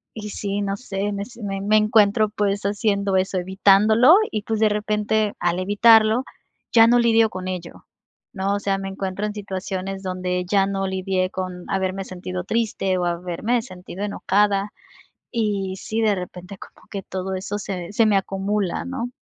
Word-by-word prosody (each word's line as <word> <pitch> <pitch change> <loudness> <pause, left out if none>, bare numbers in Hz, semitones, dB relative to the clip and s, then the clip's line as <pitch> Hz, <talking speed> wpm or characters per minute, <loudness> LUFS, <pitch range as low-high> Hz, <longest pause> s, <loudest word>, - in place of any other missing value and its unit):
y 210 -1 -6
sí, 200 0 -3
no 195 0 -1
sé. 200 -3 -3
Me 200 0 -3
se 235 +1 -12
Me 195 -1 -3
me 215 +2 +3
encuentro, 215 0 +4
pues, 205 -1 -1
haciendo 200 -1 0
eso, 190 0 +1
evitándolo. 205 - +5 0.2
Y, 215 - -2
pues, 220 0 -2
de 220 - +4
repente, 210 0 0
al 175 +1 0
evitarlo, 220 +4 +5 0.5
ya 225 -1 +7
no 240 +1 +5
lidio 225 -1 +4
con 185 -2 -6
ello, 180 -2 -6 0.5
¿no? 195 0 -1
O 205 - -1
sea, 195 -1 -1
me 195 0 -5
encuentro 195 +1 -4
en 210 - -5
situaciones, 190 -1 -4
donde 180 -1 -2
ya 195 -2 +3
no 195 0 -2
lidié, 190 -1 -1
con 185 -1 -5
haberme 190 0 -1
sentido 180 0 -6
triste, 195 -2 -1
o 180 - 0
haberme 180 +7 -1
sentido 185 -3 -8
enojada. 205 0 +1 0.6
Y, 205 -5 -1
sí, 220 +3 -3
de 215 -2 +3
repente, 180 +1 -8
como - - -15
que 200 - -4
todo 190 +1 -4
eso, 195 +2 -4
se 185 -2 -5
se 225 +2 +3
me 210 -2 +4
acumula, 195 0 -2
¿no? 260 -2 -4
200 Hz, 175 wpm, -22 LUFS, 185-215 Hz, 0.6 s, ya